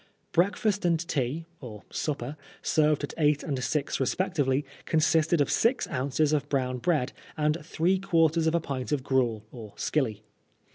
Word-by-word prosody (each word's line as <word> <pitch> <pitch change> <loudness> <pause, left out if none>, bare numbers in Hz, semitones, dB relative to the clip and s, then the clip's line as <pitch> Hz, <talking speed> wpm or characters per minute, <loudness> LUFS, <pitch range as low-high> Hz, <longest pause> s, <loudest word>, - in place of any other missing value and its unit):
Breakfast 200 +3 +1
and 170 -2 +2
tea 145 +1 -1
(or 110 -6 -9
supper), 145 -2 -3 0.3
served 150 -2 +2
at 145 - -4
eight 150 -1 +3
and 135 -5 -2
six 145 0 -1
respectively, 145 -1 0 0.2
consisted 160 0 +3
of 145 - +1
six 240 +3 +2
ounces 140 +4 +1
of 145 -1 0
brown 130 -2 0
bread 150 -2 0 0.2
and 150 0 0
three 170 +4 +1
quarters 165 -4 +2
of 160 - +2
a - - +3
pint 135 -4 -4
of 145 -3 0
gruel, 120 -6 +1
or 110 -4 -10
"skilly." 110 -8 -1
150 Hz, 155 wpm, -28 LUFS, 130-165 Hz, 0.3 s, eight